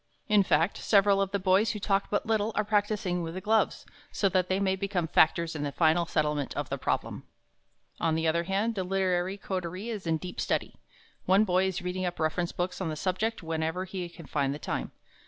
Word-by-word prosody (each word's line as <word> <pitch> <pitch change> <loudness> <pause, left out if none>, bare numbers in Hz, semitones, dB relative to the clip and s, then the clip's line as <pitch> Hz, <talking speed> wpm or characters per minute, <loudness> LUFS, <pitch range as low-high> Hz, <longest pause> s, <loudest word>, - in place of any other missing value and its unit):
In 210 -1 +5
fact, 170 -1 +2
several 200 -1 +4
of 195 - 0
the 200 - 0
boys 190 +4 +3
who 210 - -5
talk 195 0 0
but 205 - 0
little, 220 -1 +1
are 210 - +2
practising 205 -4 0
with 165 0 -5
the - - -3
gloves, 220 +3 +1 0.3
so 200 - +1
that 185 -1 +1
they 190 +1 +1
may 190 -1 +1
become 190 -3 -2
factors 165 +1 +3
in 150 - -3
the 145 -1 -2
final 165 +3 +2
settlement 150 -3 -1
of - - -3
the - - -3
problem. - - -2 0.7
On 165 -1 +1
the 160 0 0
other 170 +2 +1
hand, 200 +5 0
the 190 -3 -2
literary 185 0 0
coterie 185 +2 -4
is 210 -6 -5
in 160 -1 +2
deep 180 +3 -6
study. - - -1 0.5
One 190 +3 +5
boy 185 -1 +2
is 185 -1 -3
reading 180 0 -2
up 175 - -5
reference 165 +2 0
books 180 +2 -3
on 175 - -1
the 155 - -3
subject 190 +6 -1
whenever 160 +3 -2
he 185 -2 -5
can 170 -1 -12
find 140 -1 -1
the - - -5
time. - - -3
185 Hz, 215 wpm, -29 LUFS, 165-200 Hz, 0.7 s, In